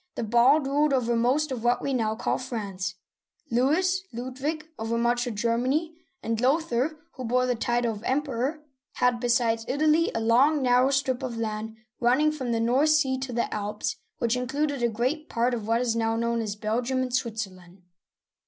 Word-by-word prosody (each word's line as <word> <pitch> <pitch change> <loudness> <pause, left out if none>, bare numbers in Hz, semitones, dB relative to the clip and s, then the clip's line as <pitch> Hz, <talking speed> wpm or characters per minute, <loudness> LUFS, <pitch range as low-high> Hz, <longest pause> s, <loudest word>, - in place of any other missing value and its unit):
the - - -3
Bald, 240 +7 +4
ruled 290 +1 +2
over 240 -3 +1
most 265 +6 +1
of 245 -3 -4
what 240 0 +2
we 275 - -2
now 220 -3 0
call - - -1
France; 200 -8 -4 0.6
Louis 330 +10 +2
(Lud 255 +2 -7
wig) 310 +2 -2
over 225 +1 -1
much 240 +1 +1
of 235 - -4
Germany; 250 +9 0 0.3
and 225 0 -1
Lothair 270 -1 +2
—^ 310 - -17
who 255 - -8
bore 250 +2 +1
the 250 - +1
title 240 0 0
of 205 - -9
Emperor: 275 +2 -1 0.2
— - - -65
had, 250 -1 +1
besides 235 -2 +1
Italy, 310 +4 +2
a - - +1
long, 260 +6 +3
narrow 250 +1 +4
strip 270 -2 0
of 250 -3 -4
land 220 0 -4 0.2
running 260 +6 +3
from 260 -6 -4
the 230 - +1
North 250 +7 +3
Sea 300 -4 +3
to 265 -1 -4
the 235 0 -1
Alps, 210 0 -3 0.2
which 235 0 0
included 275 +2 -1
a 235 - +2
great 255 +8 -2
part 240 +2 +1
of 225 -3 -4
what 230 +1 +2
is 235 -2 0
now 225 0 0
known 235 0 0
as 210 -2 -3
Belgium 240 +5 -1
and 250 -1 -5
Switzerland. 195 -7 -4
245 Hz, 190 wpm, -26 LUFS, 230-270 Hz, 0.6 s, Bald